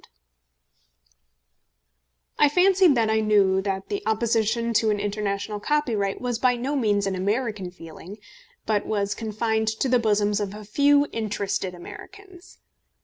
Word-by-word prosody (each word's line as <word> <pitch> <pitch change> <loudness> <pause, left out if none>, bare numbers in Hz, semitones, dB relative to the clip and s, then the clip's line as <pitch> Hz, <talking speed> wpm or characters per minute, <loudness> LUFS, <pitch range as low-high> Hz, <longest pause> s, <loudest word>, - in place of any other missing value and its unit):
] - - -41
I 295 - +6
fancied 365 -1 +4
that 225 -2 +2
I 220 - +2
knew 200 -3 +3
that 190 -1 -4
the 405 -1 -2
opposition 230 +1 0
to 220 0 +2
an 210 -1 0
international 205 0 -3
copyright 220 -7 -1
was 245 -2 -3
by 250 0 +3
no 260 +5 -3
means 205 -6 +1
an 195 - -1
American 205 0 -2
feeling, 175 +3 -11 0.5
but 210 -2 0
was 200 -1 -1
confined 220 0 -2
to 220 +4 -1
the 250 -1 +3
bosoms 210 -2 +1
of 205 -1 -4
a 210 0 -10
few 285 +6 +3
interested 200 -4 -3
Americans. 375 - -13
215 Hz, 145 wpm, -24 LUFS, 200-240 Hz, 0.5 s, I